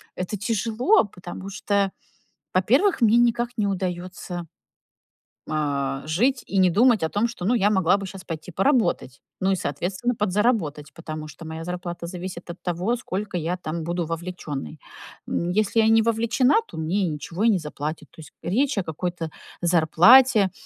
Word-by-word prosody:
это 185 +3 -3
тяжело, 230 - +2
потому 185 0 -9
что, 200 -1 0 0.6
во-первых, 255 - +3
мне 230 +1 +5
никак 240 0 +2
не 205 - +2
удаётся, 180 -2 -4 1.1
э, 140 -3 -1
жить 245 - +1
и 195 - 0
не 185 -1 +5
думать 220 +1 +4
о 160 - +1
том, 215 +4 +1
что, 230 -6 -8
ну, 245 +4 +3
я 205 -1 +3
могла 190 -1 +3
бы 200 - -5
щас 190 0 -9
пойти 165 0 -7
поработать. 195 - +1 0.2
Ну 190 +1 +2
и, - - +3
соответственно, 185 - -2
подзаработать, 185 - 0
потому 155 -2 -7
что 155 +2 -11
моя 160 +1 -6
зарплата 175 -1 -5
зависит 180 0 -7
от 170 - -12
того, 180 +7 -1
сколько 200 -4 -5
я 170 +3 -2
там 165 -1 -4
буду 175 0 -2
вовлечённой. 165 - -5 0.5
М, 170 - -1
если 215 +3 +2
я 220 - +3
не 225 0 +5
вовлечена, 230 +4 +2
то - - -11
мне 165 +6 -1
и - - -1
ничего 165 +7 -3
и - - +6
не 200 - +3
заплатят. 150 0 -5
То - - -18
есть - - -13
речь 255 +7 +1
о 195 - +1
какой-то 165 0 -4 0.3
зарплате, 185 +6 +6
185 Hz, 170 wpm, -24 LUFS, 165-215 Hz, 1.1 s, и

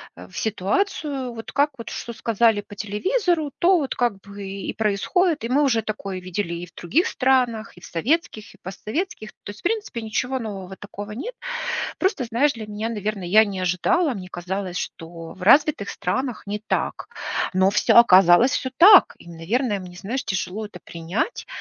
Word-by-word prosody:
в 90 +2 -13
ситуацию. 255 - -1
Вот 225 -1 -8
как 290 +1 +2
вот 230 - -7
что 235 - -6
сказали 225 -1 +2
по 205 - -13
телевизору, 310 - 0
то 365 +2 +5
вот 285 -5 -2
как 240 -5 0
бы 200 0 -10
и 195 0 -6
и - - -3
происходит. 255 - +1
И 230 - -3
мы 280 +3 +3
уже 235 -5 +2
такое 200 -3 -4
видели 180 -1 -3
и 170 +1 -6
в 165 - -21
других 290 - +1
странах, 250 -6 +1
и - - -14
в - - -11
советских, 220 - -2
и - - -21
постсоветских. 215 - -5
То - - -6
есть, 205 - -13
в - - -20
принципе, 415 - -2
ничего 250 +4 -2
нового 195 -5 -6
такого 205 +1 -8
нет. 460 - -6 0.6
Просто, 375 - 0
знаешь, 240 +6 +2
для 220 -2 -7
меня, 210 +1 -4
наверно, 210 -3 -3
я 215 +5 +6
не 195 -3 -5
ожидала, 255 - +1
мне 185 -3 -7
казалось, 180 +1 -4
что 165 0 -7
в 190 - -13
развитых 285 +1 +4
странах 250 +6 -3
не 205 +1 -3
так, - - -2 0.4
но 190 +1 +3
всё 210 - +3
оказалось 190 +2 +7
всё 260 - -1
так. 385 +3 +8
И, - - -15
наверное, 205 +7 -1
мне, 180 -1 -10
знаешь, 235 +9 -4
тяжело 195 +2 -3
это 190 -4 -12
принять. 170 - -3
215 Hz, 185 wpm, -23 LUFS, 190-265 Hz, 0.6 s, так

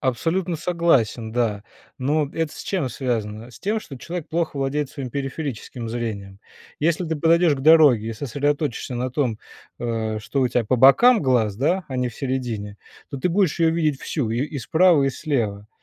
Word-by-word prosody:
Абсолютно 165 +8 -1
согласен, 150 - +1
да. 115 -4 0 0.3
Но 145 +3 0
это 160 -2 -2
с - - -9
чем 180 -9 -1
связано? 115 -3 -3
С - - -14
тем, 215 +3 0
что 145 -10 -10
человек 170 +5 -6
плохо 165 -2 -2
владеет 140 +1 -1
своим 135 -4 -6
периферическим 135 -3 -5
зрением. 105 -4 -5 0.4
Если 170 +3 +1
ты 160 - -1
подойдешь 165 +1 +3
к 135 - -6
дороге 145 -7 +6
и - - -3
сосредоточишься 140 +1 -2
на 125 +1 -2
том, 125 -6 -1 0.4
э, 110 -2 -2
что 120 +6 -2
у 130 - +2
тя 120 -1 0
по 120 - +1
бокам 185 - +6
глаз, 120 -6 +2
да, 175 - 0
а 130 - -4
не 125 0 0
в 115 - -11
середине, 120 -6 -3 0.3
то 140 - -5
ты 155 - 0
будешь 180 -2 +1
ее 165 - +4
видеть 155 -4 0
всю: 135 -9 -2
и 115 - -1
и 150 -1 -6
справа, 160 +4 +4
и 135 - +2
слева. 110 -9 -2
135 Hz, 185 wpm, -22 LUFS, 115-160 Hz, 0.4 s, дороге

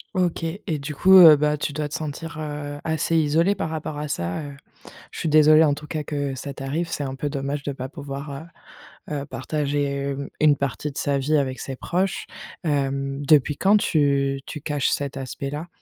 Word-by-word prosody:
OK 175 -2 0 0.2
et 155 -3 -2
du 145 +1 -6
coup, 190 +5 +5
heu, 160 -4 +10
bah, 150 +1 +1
tu 145 - -3
dois 150 -1 -3
te - - -10
sentir, 155 +3 -5
heu, 145 -1 -5
assez 160 +1 +1
isolé 160 +5 +3
par 160 - -3
rapport 155 -1 -4
à 150 0 -3
ça. 90 - -3
Heu, 140 -1 -7 0.6
je - - -8
suis 160 - -1
désolée 155 +1 +6
en 145 - +3
tout 150 +1 -8
cas 155 -2 -3
que 145 -2 -3
ça 140 +1 -6
t'arrive, 145 +6 -3
c'est 145 - -3
un 135 -1 -4
peu 145 +2 -3
dommage 140 0 -3
de 140 - -3
pas 130 0 -6
pouvoir, 140 -1 -7 0.8
heu - - -9
heu, - - -6
partager, 145 +2 -2 0.3
hem, 140 0 -5
une 150 -2 +6
partie 140 +2 -2
de 135 - -12
sa 140 -1 0
vie 150 +3 +1
avec 130 -2 -1
ses 135 - -5
proches. 185 +8 -2 0.4
Hem, 140 -2 -1
depuis 150 0 +4
quand 200 +2 +4
tu 140 -5 +1
tu 150 - -7
caches 145 -3 -1
cet 140 -1 -2
aspect-là? 140 +4 -5
145 Hz, 205 wpm, -23 LUFS, 140-155 Hz, 0.8 s, heu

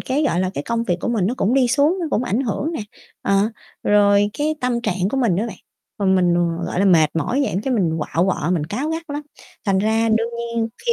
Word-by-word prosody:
cái, 270 +4 -1
gọi 180 - +1
là, 185 0 0
cái 140 - -3
công 230 0 -1
việc 175 -5 0
của - - -2
mình 215 -6 +1
nó 240 - 0
cũng 230 0 +1
đi 260 -2 +3
xuống, 290 +9 +2
nó 340 - -1
cũng 245 - +1
ảnh 220 +2 0
hưởng 275 +6 -2
nè, 320 - -3 0.4
ờ, 200 +2 +2 0.3
rồi 205 0 +4
cái 305 +1 +1
tâm 245 -1 0
trạng 195 -5 -1
của - - -2
mình 235 -10 +2
á 215 +5 0
bạn, 225 - -7 0.4
rồi 200 -2 +1
mình, 180 -2 +3 0.3
gọi - - -3
là, - - +3
mệt 165 -6 +5
mỏi 245 +11 0
vậy - - -1
cái 260 0 0
mình 165 -7 +1
quạu 165 +3 0
quọ, 175 -3 -1
mình 165 -5 0
cáu 260 - -3
gắt 325 +1 -3
lắm. 290 +1 -3 0.4
Thành 195 -3 +2
ra 220 +3 +2
đương 225 +1 +1
nhiên 235 -1 -2 0.2
khi 470 - +4
225 Hz, 255 wpm, -21 LUFS, 190-255 Hz, 0.4 s, mệt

